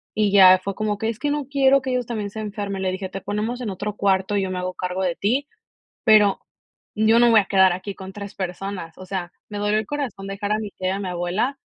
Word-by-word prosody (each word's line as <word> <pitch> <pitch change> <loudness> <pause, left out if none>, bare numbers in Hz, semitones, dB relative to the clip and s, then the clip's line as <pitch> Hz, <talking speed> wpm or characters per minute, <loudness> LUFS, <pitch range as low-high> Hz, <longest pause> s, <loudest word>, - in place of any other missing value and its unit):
y 210 -2 +2
ya 185 -2 +8
fue 200 0 -3
como 210 0 -2
que: 220 +2 -1
"Es 230 0 -5
que 295 - -1
no 295 -1 -1
quiero 275 -1 +4
que 260 - -2
ellos 250 -2 -1
también 210 -4 -4
se 220 - -7
enfermen". 205 -2 -4
Le 185 -1 0
dije: 190 0 -4
"Te 195 - -6
ponemos 220 +6 -3
en 230 - -3
otro 205 +2 -4
cuarto, 195 0 +1
y - - +2
yo 190 - -2
me 185 - -3
hago 180 0 -3
cargo 180 +1 -3
de 175 -2 0
ti, 260 +8 0 0.6
pero 210 -3 +5 0.5
yo 220 +2 +4
no 240 - +6
me 235 - +5
voy 220 - +7
a - - -2
quedar 190 -2 +5
aquí 195 +2 -6
con 190 0 -9
3 200 -1 -8
personas". 185 -2 -5
O 185 - -10
sea, 180 -2 -4 0.2
me 205 - -5
dolió 210 +1 +1
el 215 - -3
corazón 265 -10 -4
dejar 200 +1 -3
a 215 - +1
mi 215 -2 -5
tía 185 -1 -4
y - - +1
a 195 - -2
mi 195 - -3
abuela, 180 +10 -1
205 Hz, 270 wpm, -23 LUFS, 190-220 Hz, 0.6 s, ya